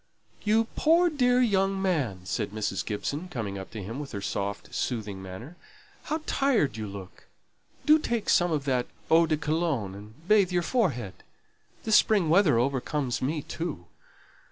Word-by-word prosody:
"You 220 +2 +3
poor 335 +2 +4
dear 250 -4 +3
young 195 -4 +2
man," 145 - 0
said 105 +2 -2
Mrs. 100 -2 -2
Gibson, 140 - -3
coming 105 - -4
up 95 - -8
to 110 -3 -7
him 115 +8 -6
with 145 -4 -7
her 100 - -3
soft, 100 +1 -4
soothing 105 -6 -3
manner; 95 - -9 0.5
"how 310 +1 -2
tired 250 - +1
you 110 -1 -4
look! 100 -2 -10 0.6
Do 305 +1 +6
take 235 -7 -2
some 175 -1 +3
of 150 -3 -1
that 125 -3 0 0.2
eau 165 +1 +6
de 155 -1 +1
Cologne 150 - -1
and 105 - -13
bathe 200 -3 +4
your 175 -1 +1
forehead. 145 - 0 0.7
This 220 -1 +5
spring 200 -7 +3
weather 165 - +5
overcomes 135 +1 -1
me 145 +3 -1
too. 160 - -5
150 Hz, 160 wpm, -27 LUFS, -, 0.7 s, Do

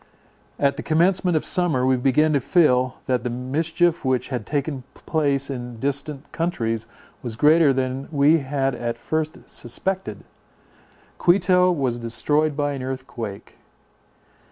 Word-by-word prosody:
At 140 0 +1
the - - -3
commencement 175 +2 +2
of - - -2
summer, 160 -9 +1
we 130 0 +3
began 140 +5 +2
to 140 - +3
feel, 130 -5 +2
that 125 -3 0
the 125 - -2
mischief 160 +7 0
which 130 -2 0
had 125 -6 -4
taken 145 -2 -2
place 140 -3 0
in 125 -3 -6
distant 140 +2 -3
countries 115 -10 -2 0.3
was 120 -3 -6
greater 150 +4 +5
than 130 0 -2
we 150 +2 +4
had 135 -1 -1
at 120 -1 -3
first 155 +5 -2
suspected. 190 +11 -4 1.0
Quito 180 0 +4
was 130 -7 -1
destroyed 145 +6 +1
by 145 -1 0
an 140 -2 -5
earthquake. 130 -6 -7
140 Hz, 135 wpm, -23 LUFS, 125-160 Hz, 1.0 s, greater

